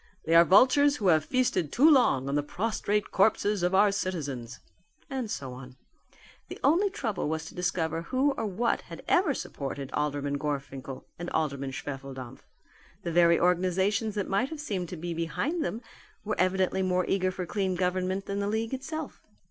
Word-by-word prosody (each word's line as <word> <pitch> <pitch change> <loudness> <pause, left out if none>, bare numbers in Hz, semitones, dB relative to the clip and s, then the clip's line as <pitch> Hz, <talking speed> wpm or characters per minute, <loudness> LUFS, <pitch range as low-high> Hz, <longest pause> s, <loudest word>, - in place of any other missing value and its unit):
They 165 - +1
are 170 0 +9
vultures 260 - +5
who 200 -8 +1
have 155 -3 +4
feasted 215 - 0
too 285 +5 +5
long 245 - +4
on 140 - -2
the 145 - +2
prostrate 210 +5 -2
corpses 205 0 +2
of 180 +2 +1
our 205 +1 +5
citizens." 145 - -4 0.5
And 260 -5 -3
so 135 -9 -5
on. 125 0 -11 0.7
The - - -8
only 355 +8 +4
trouble 225 - -3
was 160 0 -2
to - - -10
discover 165 -2 -1
who 260 +10 +1
or 245 -5 -3
what 215 +5 0
had - - -11
ever 350 -7 +3
supported 140 -1 -5
Alderman 145 -1 -1
Gorfinkel 135 -2 -5
and 175 0 -4
Alderman 140 -3 -1
Schwefeldampf. 135 -2 -7 0.6
The 170 - -2
very 170 0 +5
organizations 190 +4 +1
that 205 -2 -2
might 220 +7 0
have 315 - -7
seemed 190 - -3
to 180 - -6
be 170 +2 -4
behind 280 - -2
them 235 -3 -4 0.4
were 215 - -2
evidently 185 +1 +1
more 185 -1 +1
eager 185 -1 +1
for 185 -1 -4
clean 190 0 -1
government 185 +1 -1
than 200 0 -3
the 200 - -1
league 225 +3 -2
itself. 310 +4 -5
185 Hz, 175 wpm, -28 LUFS, 155-220 Hz, 0.7 s, are